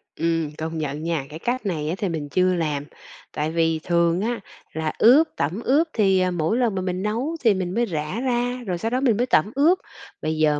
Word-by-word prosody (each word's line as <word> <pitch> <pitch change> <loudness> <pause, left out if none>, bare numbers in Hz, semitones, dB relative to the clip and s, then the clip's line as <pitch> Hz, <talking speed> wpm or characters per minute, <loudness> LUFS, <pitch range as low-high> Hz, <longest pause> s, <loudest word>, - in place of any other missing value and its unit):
Ừm, 165 -2 0
công 160 +1 -4
nhận 150 0 -3
nha, 165 -5 -1
cái 155 +2 -8
cách 245 +3 -2
này 155 -5 -2
á 175 - -1
thì 195 -2 -1
mình 155 -3 -4
chưa 185 +3 +2
làm. 150 -4 -1 0.5
Tại 150 +1 -2
vì 165 -1 +1
thường 170 +1 +2
á, 235 0 -1 0.3
là 160 -1 -2
ướp, 285 +8 +6
tẩm 170 +10 -2
ướp 300 +6 +3
thì, 195 -4 +3
ờ, 185 0 +1
mỗi 175 +6 0
lần 235 -5 +1
mà 190 - -1
mình 185 +1 -2
nấu 245 +10 -1
thì 225 -4 +5
mình 185 -1 -3
mới 240 +2 +1
rã 160 +2 -3
ra, 245 -1 -1
rồi 180 -2 -1
sau 225 +6 -3
đó 255 - 0
mình 235 -6 +3
mới 245 - +2
tẩm 205 -4 +2
ướp. 320 +7 +4 0.4
Bây 155 0 -2
giờ 150 -1 +3
180 Hz, 230 wpm, -23 LUFS, 160-235 Hz, 0.5 s, ướp